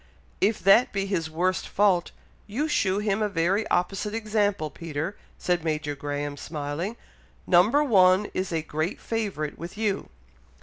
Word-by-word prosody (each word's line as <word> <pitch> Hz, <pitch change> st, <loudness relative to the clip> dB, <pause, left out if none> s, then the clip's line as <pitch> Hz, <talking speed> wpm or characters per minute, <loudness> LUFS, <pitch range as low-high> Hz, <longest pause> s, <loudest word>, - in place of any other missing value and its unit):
"If 215 Hz, +2 st, +3 dB
that 195 Hz, +6 st, +6 dB
be 195 Hz, -1 st, -1 dB
his 175 Hz, -5 st, -2 dB
worst 180 Hz, +4 st, 0 dB
fault, 190 Hz, -4 st, +2 dB, 0.4 s
you 255 Hz, +9 st, -1 dB
shew 195 Hz, -10 st, +1 dB
him 210 Hz, 0 st, 0 dB
a 210 Hz, -, +1 dB
very 195 Hz, +4 st, +1 dB
opposite 195 Hz, +4 st, -1 dB
example, 205 Hz, -7 st, 0 dB
Peter," 165 Hz, +3 st, -4 dB, 0.2 s
said 175 Hz, -2 st, 0 dB
Major 155 Hz, -2 st, -1 dB
Graham, 145 Hz, 0 st, -4 dB
smiling; 155 Hz, +9 st, -4 dB, 0.5 s
"number 210 Hz, +12 st, +5 dB
one 190 Hz, -5 st, +5 dB
is 185 Hz, 0 st, -2 dB
a 160 Hz, -2 st, -1 dB
great 155 Hz, +3 st, -3 dB
favourite 200 Hz, -10 st, -3 dB
with 170 Hz, +5 st, -8 dB
you." 210 Hz, -3 st, -1 dB
185 Hz, 145 wpm, -26 LUFS, 160-210 Hz, 0.5 s, that